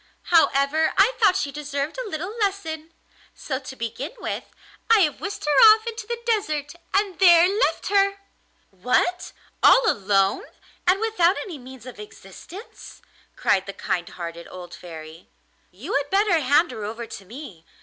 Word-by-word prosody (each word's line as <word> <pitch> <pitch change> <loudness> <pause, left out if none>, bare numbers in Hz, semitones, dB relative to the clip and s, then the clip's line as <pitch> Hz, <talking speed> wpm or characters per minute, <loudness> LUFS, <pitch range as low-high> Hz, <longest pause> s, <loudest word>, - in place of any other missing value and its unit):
However, 310 -1 +3
I 415 +6 +5
thought 405 -5 +4
she 280 - -1
deserved 290 - -4
a - - -5
little 370 +6 -5
lesson, 330 -6 -3 0.4
so 265 -3 -4
to 265 -1 -10
begin 240 +6 -5
with - - -5 0.4
I 450 -2 +6
have 305 -5 0
whisked 405 -5 -5
her 295 +9 +7
off 440 +1 -12
into 455 -2 -6
the 475 0 -3
desert, 310 -11 -1 0.2
and 395 -2 0
there 345 -2 +7
left 410 +5 0
her!' 395 0 +2 0.5
'What! 250 - 0 0.3
all - - +6
alone, 195 - +1 0.4
and 370 +2 +4
without 410 -5 +2
any 345 -8 -7
means 255 -1 -13
of 255 -4 -10
existence?' 210 - -12 0.3
cried 195 -1 +1
the 200 - -6
kind 175 -2 -3
hearted 170 -1 -8
old 175 -1 -10
Fairy. 160 -1 -11 0.4
'You 235 - -8
had 285 0 0
better 390 -3 +2
hand 290 +4 +2
her 215 - -7
over 225 +3 -5
to 200 - -10
me. 210 - -11
300 Hz, 160 wpm, -23 LUFS, -, 0.5 s, her